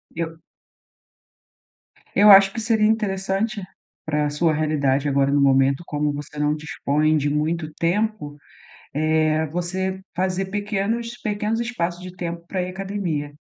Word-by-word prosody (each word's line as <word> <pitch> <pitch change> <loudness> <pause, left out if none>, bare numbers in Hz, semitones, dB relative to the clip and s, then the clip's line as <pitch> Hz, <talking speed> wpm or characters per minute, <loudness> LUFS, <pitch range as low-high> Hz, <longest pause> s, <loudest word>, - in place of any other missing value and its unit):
Eu 165 -1 -4 1.8
Eu 210 +1 +7
acho 195 0 +8
que 230 - -4
seria 220 -1 +2
interessante 205 0 -1 0.4
para 150 -1 0
sua 155 +2 +1
realidade, 145 -2 +1
agora 140 0 +2
no 145 - +3
momento, 135 +2 +3
como 150 0 -1
você 150 +1 -8
não 150 0 +1
dispõe 155 0 0
de 145 0 0
muito 155 +2 -1
tempo, 180 -3 -1 0.6
eh, 155 +1 +2
você 185 +4 -3
fazer 185 +1 -1
pequenos 210 +4 -2
pequenos 210 +1 -1
espaços 180 -7 -3
de 185 -1 -9
tempo 170 -1 -5
para 185 -1 -2
ir 180 - -3
academia. 185 -6 -3
170 Hz, 135 wpm, -22 LUFS, 150-195 Hz, 1.8 s, acho